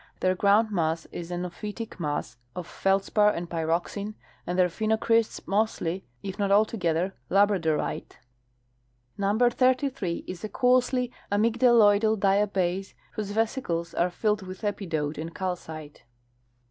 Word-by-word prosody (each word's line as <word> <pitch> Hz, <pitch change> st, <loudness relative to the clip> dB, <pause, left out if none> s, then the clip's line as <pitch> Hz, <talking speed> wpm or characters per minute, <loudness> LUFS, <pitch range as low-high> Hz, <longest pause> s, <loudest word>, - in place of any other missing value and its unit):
Their 185 Hz, 0 st, +2 dB
groundmass 195 Hz, -5 st, +2 dB
is 170 Hz, -1 st, -6 dB
an 175 Hz, 0 st, -3 dB
ophitic 210 Hz, +4 st, -7 dB
mass 145 Hz, -6 st, -3 dB, 0.2 s
of 180 Hz, -, -5 dB
feldspar 195 Hz, +3 st, +2 dB
and 175 Hz, -4 st, -3 dB
pyroxene, 170 Hz, +6 st, -2 dB, 0.3 s
and 180 Hz, -, -2 dB
their, 180 Hz, -1 st, +5 dB
phenocrysts 220 Hz, +4 st, 0 dB
mostly, 195 Hz, -3 st, -1 dB, 0.2 s
if 195 Hz, +1 st, -6 dB
not 200 Hz, -1 st, +1 dB
altogether, 195 Hz, -4 st, +2 dB, 0.2 s
labradorite. 190 Hz, -6 st, +1 dB, 1.0 s
Number 210 Hz, +5 st, +2 dB
33 255 Hz, -, +1 dB
is 185 Hz, +1 st, -7 dB
a 215 Hz, -, -3 dB
coarsely 250 Hz, +2 st, +2 dB, 0.2 s
amygclaloidal 220 Hz, -1 st, +4 dB
diabase 195 Hz, -2 st, +1 dB, 0.2 s
whose 210 Hz, -2 st, -4 dB
vesicles 205 Hz, -6 st, -1 dB
are 175 Hz, -, +1 dB
filled 210 Hz, +3 st, 0 dB
with 185 Hz, +2 st, -9 dB
epidote 160 Hz, -8 st, -2 dB
and 165 Hz, +1 st, -6 dB
calcite. 160 Hz, -5 st, -5 dB
195 Hz, 120 wpm, -27 LUFS, 175-215 Hz, 1.0 s, their